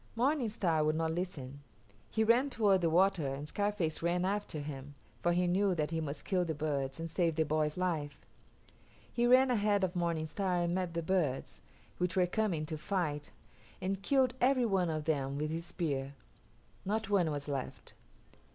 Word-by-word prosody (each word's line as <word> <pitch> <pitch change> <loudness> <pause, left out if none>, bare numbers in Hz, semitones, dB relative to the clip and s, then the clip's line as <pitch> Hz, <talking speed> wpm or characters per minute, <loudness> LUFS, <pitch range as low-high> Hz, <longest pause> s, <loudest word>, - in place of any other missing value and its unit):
Morning 255 0 +1
Star 170 -7 +1
would 155 0 +2
not 160 0 0
listen. 155 -6 -4 0.5
He 220 - +1
ran 240 +5 +4
toward 205 -7 +3
the 170 - +2
water 175 -2 +3
and 145 +2 -6
Scarface 200 -3 -1
ran 175 +2 +1
after 200 -3 -2
him, 145 -1 -7 0.3
for 175 - +2
he 180 +1 +2
knew 185 +2 +2
that 155 -1 -1
he 165 -1 -1
must 145 -1 -5
kill 185 -3 +1
the 160 -2 -3
birds 140 -2 -2
and 165 - -3
save 165 -1 0
the 160 - +3
boy's 155 +1 0
life. 155 -6 -2 0.9
He 240 0 +2
ran 255 +1 +6
ahead 205 -3 +2
of 185 0 0
Morning 170 -2 0
Star 185 +3 -1
and 170 0 0
met 180 -2 -2
the 170 - -1
birds, 160 -7 -1 0.4
which 180 +1 0
were 185 -1 +4
coming 180 -4 0
to 155 0 -5
fight, 155 -6 -2 0.5
and 195 +1 -2
killed 260 +2 +3
every 255 0 +4
one 190 -5 +1
of 155 -1 -2
them 140 -3 0
with 150 +1 -2
his 165 +1 -4
spear; 140 -6 -2 0.7
not 210 +1 -2
one 185 -5 +3
was 145 -1 -4
left. 140 -3 -5
175 Hz, 185 wpm, -33 LUFS, 155-195 Hz, 0.9 s, ran